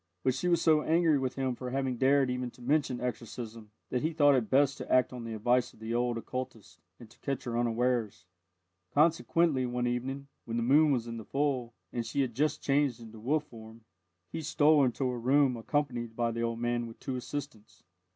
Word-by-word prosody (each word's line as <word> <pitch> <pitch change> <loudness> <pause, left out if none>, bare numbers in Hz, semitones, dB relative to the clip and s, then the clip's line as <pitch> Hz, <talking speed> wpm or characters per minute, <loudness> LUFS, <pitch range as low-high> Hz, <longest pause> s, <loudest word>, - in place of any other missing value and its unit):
But 130 - +2
she 130 +7 -2
was 170 -2 +3
so 155 -2 +5
angry 160 -2 +3
with 130 -1 -2
him 130 -2 -1
for 125 +1 -6
having 130 -1 -1
dared 135 0 +3
even 125 0 -2
to - - -17
mention 135 -2 +1
exorcism, 115 -2 -6 0.2
that 125 - 0
he 160 +2 -1
thought 145 -2 +5
it 125 -5 +1
best 140 0 +3
to - - -6
act 130 0 +3
on 120 -2 -6
the 115 -1 -5
advice 120 +3 +1
of - - -21
the 110 +1 -4
old 120 0 0
occultist 125 -2 -6 0.2
and 120 - -12
to 115 - -22
catch 135 -2 -3
her 120 -1 -4
unawares. 120 -4 0 0.7
Consequently, 155 -3 +3
one 125 0 -1
evening, 130 +3 -3 0.2
when 115 0 -3
the 115 - 0
moon 145 +5 +5
was 120 -4 0
in 115 -1 -6
the 110 - -7
full, 135 -4 -1 0.2
and 120 - -1
she 115 +5 -1
had 130 -3 -1
just 150 +6 0
changed 140 -3 +1
into 115 -1 -11
wolf 145 +7 0
form, 115 -4 -13 0.5
he - - -4
stole 150 -1 +4
into 130 +1 0
her 125 -1 -2
room 130 +2 +3
accompanied 120 -2 -2
by 120 0 0
the 115 0 -3
old 115 0 -1
man 120 0 0
and 115 -1 -8
two 130 - -4
assistants. 125 -3 -7
125 Hz, 210 wpm, -30 LUFS, 115-140 Hz, 0.7 s, so